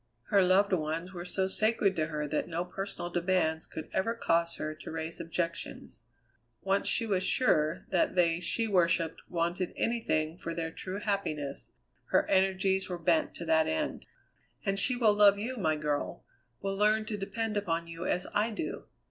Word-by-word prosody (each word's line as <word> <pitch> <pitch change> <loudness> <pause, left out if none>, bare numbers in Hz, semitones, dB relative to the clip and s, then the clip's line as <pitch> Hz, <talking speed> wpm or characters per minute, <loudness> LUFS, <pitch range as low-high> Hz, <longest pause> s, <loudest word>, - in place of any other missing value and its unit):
Her 200 - +5
loved 190 +2 +4
ones 165 +2 -2
were 175 -1 -6
so 190 +1 0
sacred 205 0 +2
to 155 -1 +1
her 150 -2 -3
that 150 +1 -1
no 170 +1 -2
personal 195 -1 -5
demands 170 -2 +1
could 160 - -7
ever 225 +5 0
cause 170 -6 +1
her 155 0 -4
to 155 - -10
raise 160 +1 -5
objections. 170 0 -4 0.6
Once 195 +1 +1
she 230 - +2
was 195 -4 +1
sure 165 - +2
that 185 0 +2
they 170 -2 +3
she 225 +6 0
worshipped 170 -4 +2
wanted 175 +1 -1
anything 175 -8 0
for 165 - -4
their 160 -1 -3
true 185 +4 -5
happiness, 155 -10 -3 0.4
her - - +2
energies 190 0 +2
were 180 - -3
bent 300 - +1
to 170 - -6
that 160 -1 +3
end. 80 - -2 0.6
"And 195 0 +2
she 250 +5 +4
will 225 -4 +4
love 205 -1 +6
you, 235 +5 -3
my 160 -7 +1
girl; 150 -1 -2 0.4
will 195 0 -1
learn 215 +2 +3
to 215 - -3
depend 215 +2 -3
upon 170 -5 -1
you 165 +2 -6
as 180 - 0
I 210 +2 +2
do. 230 +8 -5
180 Hz, 175 wpm, -30 LUFS, 165-200 Hz, 0.6 s, love